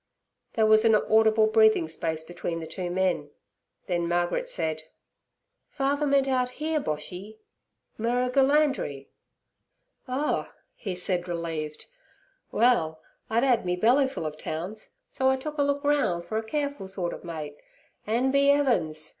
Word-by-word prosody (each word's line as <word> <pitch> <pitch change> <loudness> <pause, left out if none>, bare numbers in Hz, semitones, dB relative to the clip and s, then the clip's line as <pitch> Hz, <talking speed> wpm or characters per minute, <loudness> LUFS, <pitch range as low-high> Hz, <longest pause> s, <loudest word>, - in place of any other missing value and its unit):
There 220 -2 +3
was 215 0 +5
an 225 -1 +5
audible 220 +1 +4
breathing 220 -5 +4
space 160 0 -3
between 170 0 -5
the 165 - -6
two 175 +2 -5
men, 180 -5 0 0.6
then 175 -2 -1
Margaret 175 - 0
said: 160 - -2 0.8
'Father 285 +2 0
meant 275 -1 +3
out 255 -2 +1
here, 310 +1 0
Boshy—Merrigulandri.' 215 - -1 1.0
'Oh' 265 +4 -1 0.2
he 190 -4 -5
said, 180 0 -1
relieved. 165 -3 -4 0.7
'Well, 190 -10 +2 0.3
I'd 230 +2 +2
'ad 250 -4 +3
me 180 0 0
bellyfull 265 - +2
of 155 0 -5
towns, 185 +7 -6 0.2
so 265 0 +1
I 265 - +3
took 300 +3 -6
a - - +4
look 285 0 0
roun' 285 -13 +1
fer 195 +6 -4
a 220 - -1
careful 285 -3 -3
sort 190 -2 -3
ov - - -9
mate, 155 -4 -6 0.5
an', 240 +5 +1
be 280 +1 +4
'eavens! 170 - +1
215 Hz, 140 wpm, -27 LUFS, 170-265 Hz, 1.0 s, was